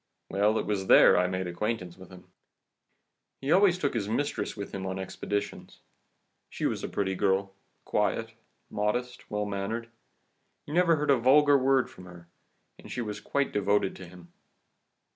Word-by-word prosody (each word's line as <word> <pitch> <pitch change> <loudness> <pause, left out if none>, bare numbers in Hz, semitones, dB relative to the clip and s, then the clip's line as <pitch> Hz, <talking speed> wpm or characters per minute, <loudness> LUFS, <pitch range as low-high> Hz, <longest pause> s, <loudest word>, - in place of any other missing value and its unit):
Well, 105 +3 +2
it - - -1
was 100 -2 -2
there - - +7
I 90 - +3
made 95 0 -3
acquaintance 90 0 -3
with 95 0 -14
him. 90 - -13 1.2
He 135 +2 -2
always 185 0 +5
took 145 -6 -1
his 105 -4 -2
mistress 140 0 -2
with 100 - -7
him 95 - -4
on 95 0 -3
his 95 - -3
expeditions. 100 +2 -5 0.7
She - - -4
was - - -1
a - - -3
pretty 95 -1 -1
girl, 95 +1 0 0.3
quiet, - - -1 0.4
modest, 120 +4 -2
well 105 -1 -2
mannered, 105 +4 -4 0.7
you 145 - -8
never 170 -1 +4
heard 150 -1 +1
a 135 - +5
vulgar 145 +4 +5
word 135 -1 +3
from 90 - -14
her, 85 -2 -13 0.5
and - - -12
she 125 - -3
was 105 -3 -5
quite 140 -1 -1
devoted 100 -1 +1
to 95 - -10
him. 85 -1 -15
105 Hz, 170 wpm, -28 LUFS, 95-130 Hz, 1.2 s, there